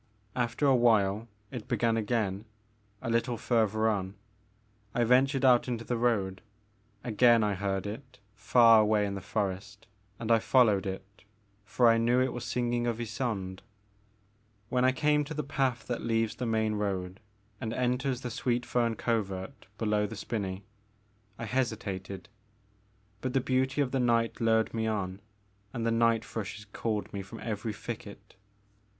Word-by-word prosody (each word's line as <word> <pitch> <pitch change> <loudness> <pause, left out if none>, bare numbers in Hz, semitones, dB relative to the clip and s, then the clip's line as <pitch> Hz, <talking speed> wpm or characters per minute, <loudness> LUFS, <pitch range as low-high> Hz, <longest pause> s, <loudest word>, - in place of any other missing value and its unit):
After 120 +3 0
a 135 -2 +5
while 110 -3 +3 0.2
it 120 -5 -7
began 115 -1 +1
again, 105 -2 -1 0.6
a 115 - -3
little 115 +1 0
further 110 -1 +1
on. 100 -3 -1 0.8
I 120 - +3
ven 125 +3 +5
tured 135 -1 -3
out 125 -2 +5
into 120 -2 -3
the 120 - -1
road. 105 -6 0 0.6
Again 120 0 +4
I 105 -1 +1
heard 95 0 -2
it 130 +5 -7 0.2
far 115 +1 +6
away 105 -1 +2
in 100 - -3
the 100 - -5
forest 100 +1 -3 0.3
and 115 -1 -3
I 115 - +6
followed 110 -5 +3
it, 95 +1 -8 0.4
for 120 +5 +3
I 115 0 +5
knew 120 +2 +3
it 130 -1 +1
was 120 - -5
singing 120 -1 -1
of 115 -2 -1
Ysonde. 110 -5 -3 1.1
When 125 0 +1
I 130 - +5
came 150 +2 +2
to 150 +2 -7
the 150 - -2
path 135 -3 -1
that 120 - -3
leaves 115 -1 0
the 125 - -2
main 110 -1 +1
road 95 -3 -3 0.4
and 110 - -3
enters 125 +1 -1
the 125 - -4
Sweet 120 +2 -1
Pern 115 -2 0
Covert 105 +1 -3
below 105 -1 +1
the 110 - -7
spinney, 100 -2 -4 0.7
I 120 - -5
hesitated; 100 -7 -3 0.9
but 130 -1 -2
the 135 - +3
beauty 130 +2 +1
of 130 -3 0
the 135 - 0
night 115 -2 +1
lured 110 -1 +2
me 110 -1 -1
on 100 -3 -3 0.5
and 115 -1 -3
the 115 - +2
night 115 -1 +2
thrushes 105 -1 -6
called 110 -2 -2
me 100 - -3
from 100 +4 -10
every 110 -1 -3
thicket. 105 -1 -8
115 Hz, 160 wpm, -29 LUFS, 105-125 Hz, 1.1 s, far